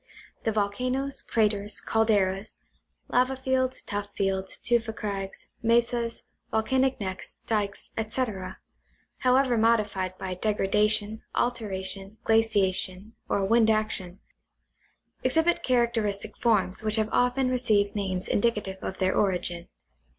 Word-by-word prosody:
The 225 - +2
volcanoes, 250 +7 -1
craters, 210 -2 0
calderas, 205 -3 +1 0.5
lava 255 +2 +2
fields, 260 0 -1
tuff 205 0 -4
fields, 190 -1 -1
tufa 235 -2 0
crags, 195 -2 -5 0.2
mesas, 235 0 +1 0.3
volcanic 260 +4 +1
necks, 190 -2 -5
dykes, 205 -3 -2
etc., 215 -4 -2 0.6
however 255 -2 +3
modified 205 -5 +1
by 185 -1 -4
degrada 210 +1 +1
tion, 215 +1 +1
alteration, 195 -3 -2
glaciation, 205 -2 +1 0.2
or 195 - +1
wind 225 +2 +4
action, 215 -4 -1 1.0
exhibit 320 +6 +2
characteristic 225 -4 0
forms 205 -5 +1
which 215 0 +3
have 220 -1 +1
often 250 +1 +2
received 220 -5 +2
names 190 -3 -1
indicative 205 -3 0
of 190 - -5
their 185 -1 +1
origin. 175 -3 0
215 Hz, 110 wpm, -27 LUFS, 195-235 Hz, 1.0 s, wind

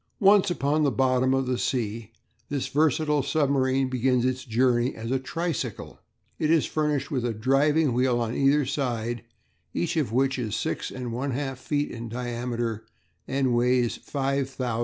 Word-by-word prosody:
Once 200 -1 +5
upon 150 -2 +1
the 145 - +3
bottom 130 -1 +2
of 135 0 +1
the 125 -1 -1
sea 115 -3 -2 0.4
this 140 -2 -2
versatile 150 0 +2
submarine 135 -2 +1
begins 125 -1 +1
its 130 0 -1
journey 120 +1 +2
as 115 +2 -5
a 135 - +1
tricycle. 165 +4 -4 0.4
It 155 - +1
is 160 -2 +4
furnished 150 -1 -1
with 130 -4 -1
a 120 -2 -1
driving 140 +5 +2
wheel 125 0 +2
on 115 -1 -1
either 140 +2 +3
side, 120 -4 -2 0.5
each 175 0 -1
of 145 -8 0
which 135 +2 +1
is 110 -3 -2
6 - - -2
1/2 130 +2 -3
feet 145 +3 -2
in 115 0 -6
diameter 120 -2 -3 0.4
and 135 -2 +1
weighs 120 0 +2
5000 135 -1 -2
lbs. 120 -3 -1
130 Hz, 160 wpm, -26 LUFS, 120-140 Hz, 0.5 s, Once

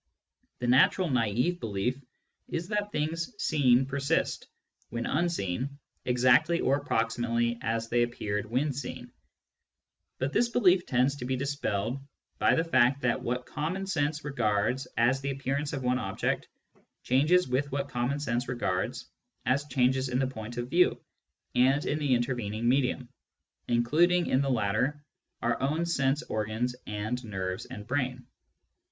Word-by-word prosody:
The 125 - -4
natural 135 +8 +4
nafve 125 - +1
belief 115 +5 -2 0.5
is 170 +2 -3
that 210 -1 -1
things 165 +8 -2
seen 135 -4 +3
persist, 140 +3 -1 0.4
when 120 +1 -3
unseen, 140 - -1 0.3
exactly 130 +7 +4
or 135 - +2
approximately 120 -2 0
as 115 0 -1
they 120 +1 +2
appeared 105 -4 -2
when 135 +5 0
seen; 125 -2 -6 1.1
but 135 +2 -2
this 240 - +3
belief 190 -7 +3
tends 130 +1 +2
to 125 - -5
be 130 +1 0
dispelled 130 -4 -2 0.4
by - - +4
the 165 - +2
fact 130 -3 +3
that 125 +1 +1
what 125 0 -2
common 170 +9 -3
sense 150 -5 -1
regards 120 -2 0
as 125 +3 +3
the 140 - -2
appear 135 0 -2
ance 145 0 -3
of 135 -3 -4
one 125 0 +1
object 95 -3 -2 0.6
changes 155 +8 +3
with 135 +3 -1
what 140 0 -2
common 125 +3 -1
sense 120 -3 -1
regards 95 -7 -2 0.4
as 140 +3 +1
changes 130 0 +1
in 125 - 0
the 135 - +2
point 120 -2 -7
of 120 0 -2
view 180 +1 +4 0.5
and 135 +4 +3
in 150 - 0
the 140 -4 +2
inter 120 +2 0
vening 110 -2 -4
medium, 125 0 +1 0.6
including 165 +10 +3
in 130 - +2
the 140 - 0
latter 125 +6 0 0.4
our 115 0 0
own 155 +5 0
sense 145 -2 +1
organs 110 +2 -2
and 110 +4 -3
nerves 95 -4 -4
and 105 - -8
brain. 130 0 -2
130 Hz, 150 wpm, -29 LUFS, 120-145 Hz, 1.1 s, natural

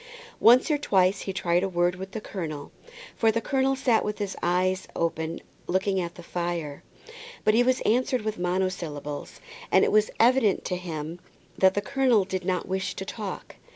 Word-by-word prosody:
Once 250 +6 +6
or 295 - +2
twice 190 -7 +2
he 195 - -3
tried 175 -2 +1
a 195 - -1
word 175 0 +1
with 190 +1 -7
the 210 - -5
colonel, 155 -9 -6 0.4
for 225 -1 +3
the 230 - 0
colonel 270 +3 +1
sat 250 -4 +2
with 210 0 -3
his 200 -2 -3
eyes 185 +2 +1
open 165 0 -2 0.3
looking 190 +1 +1
at 170 -1 -5
the 175 - -11
fire. 170 -4 -4 0.6
But 215 - +4
he 230 - +5
was 255 +1 +2
answered 250 +1 +1
with 215 -2 -3
monosyllables, 175 -5 -3 0.3
and - - +5
it - - 0
was 215 0 +4
evident 230 -4 +3
to 180 - -1
him 165 -2 -5 0.4
that 190 0 +4
the 205 - +1
colonel 245 -5 +2
did 185 -1 -3
not 185 -1 -1
wish 190 0 -2
to 190 - -5
talk. 205 0 -7
190 Hz, 185 wpm, -26 LUFS, 175-215 Hz, 0.6 s, Once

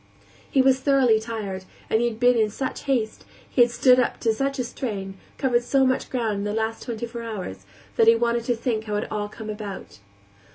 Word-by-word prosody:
He 265 - +3
was 265 0 +4
thoroughly 260 -5 +4
tired; 210 -4 -5 0.2
he 230 +2 +2
had 225 -2 -5
been 245 0 +5
in 220 -2 +2
such 260 +5 -5
haste, 240 -6 -1 0.2
he 250 - +2
had 240 - +6
stood 250 +1 +5
up 250 - 0
to 225 - +2
such 275 +4 -1
a 250 - 0
strain, 200 -6 -5 0.2
covered 245 -3 +2
so 270 +2 +3
much 260 0 0
ground 225 -5 -1
in - - -3
the 210 0 -2
last 225 0 -2
twenty 235 -1 -4
four 235 0 -7
hours, 185 - -6 0.3
that 225 - +5
he 230 - +8
wanted 235 0 0
to 245 - +1
think 225 -1 -2
how 210 -1 -2
it 205 - 0
had - - -9
all 205 -1 -2
come 220 +1 -9
about. 210 - -8
230 Hz, 220 wpm, -24 LUFS, 215-250 Hz, 0.3 s, he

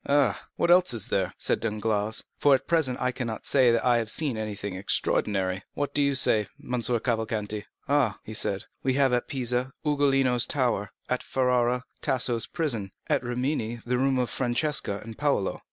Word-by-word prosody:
"Ah, 140 -6 +2
what 170 - +2
else 180 -8 +5
is 110 - -3
there?" 95 -2 0
said - - +1
Danglars; 110 -1 -1 0.2
"for, 145 -2 +5
at 130 - -3
present, 155 -7 +1
I 125 - +1
cannot 120 -3 -5
say 130 -3 +4
that 115 0 +1
I 120 -1 +4
have 115 -1 -3
seen 145 0 -1
anything 105 -2 -4
extraordinary. 95 0 0
What 145 -1 -2
do 145 - +2
you 140 -1 +2
say, 105 -5 +3
M. 125 -1 -3
Cavalcanti?" 110 -3 -1 0.2
"Ah," 140 -8 +2 0.2
said 100 -2 0
he, - - -13 0.2
"we 130 - +1
have 135 -1 +3
at 120 - 0
Pisa, 125 0 -1
Ugolino's 135 -4 +2
tower; 120 -7 0 0.2
at 125 - -1
Ferrara, 125 -1 +1 0.2
Tasso's 120 -3 +1
prison; 120 - -1 0.2
at - - +3
Rimini, 120 -1 -2
the 125 +1 0
room 135 0 +2
of 125 -3 0
Francesca 120 -4 0
and 115 0 -10
Paolo." 140 -10 0
125 Hz, 175 wpm, -27 LUFS, 110-135 Hz, 0.2 s, else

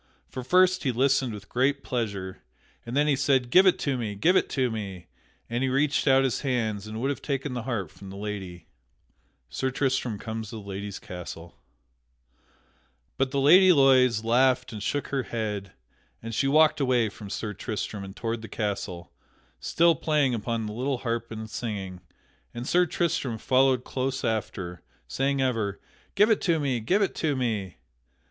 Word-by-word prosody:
For 130 - -7
first 185 +6 +4
he 135 - 0
listened 130 0 +2
with 105 -1 -9
great 135 +3 +1
pleasure, 100 -6 -3 0.5
and 120 +4 -3
then 145 - +4
he 150 -2 +3
said, 130 -2 +1
"Give 190 +5 +7
it 185 - +5
to 135 -3 -1
me! 105 -3 -3
Give 170 - +3
it - - +2
to 130 -3 0
me!" 100 -5 -6 0.4
and 120 +1 -2
he 130 - +1
reached 140 +3 +1
out 135 0 +5
his 130 -3 0
hands 110 -6 -1
and 110 +1 -6
would 135 +4 0
have 140 - -5
taken 140 -1 -3
the 120 - -3
harp 110 -9 -3
from 100 - -12
the 95 - -9
lady. 100 -4 -6 0.8
[Sidenote: - - -39
Sir 130 - -1
Tristram 130 -4 -1
comes 110 0 -5
to 115 - -8
the 105 -2 -9
Lady's 100 0 -5
castle] 85 -2 -9 1.6
But 135 0 +1
the 140 +1 -1
Lady 180 +7 +7
Loise 130 -6 +5
laughed 125 +2 +2
and 105 - -6
shook 145 +7 -2
her 135 -2 0
head, 105 -5 -4 0.5
and 115 0 -5
she 135 +5 +1
walked 155 +2 +4
away 125 -4 +2
from 105 0 -10
Sir 105 +1 -4
Tristram 105 -1 -4
and 95 0 -9
toward 115 -1 -3
the 115 - -8
castle, 95 -5 -4 0.5
still 170 0 +3
playing 150 -3 +1
upon 115 0 -2
the 105 - -5
little 130 +4 -1
harp 115 -1 -3
and 110 -1 -6
singing; 100 -5 -5 0.5
and 120 +2 -5
Sir 180 +2 +3
Tristram 160 -9 -1
followed 130 +1 +3
close 135 +1 -3
after, 95 -6 -3 0.3
saying 135 - 0
ever, 110 -6 -1 0.4
"Give 210 +2 +5
it 220 - +2
to 170 -4 +2
me! 135 -5 0
Give 190 - +2
it 195 - -1
to 150 -3 0
me!" 110 -8 -2
120 Hz, 180 wpm, -26 LUFS, 105-135 Hz, 1.6 s, Give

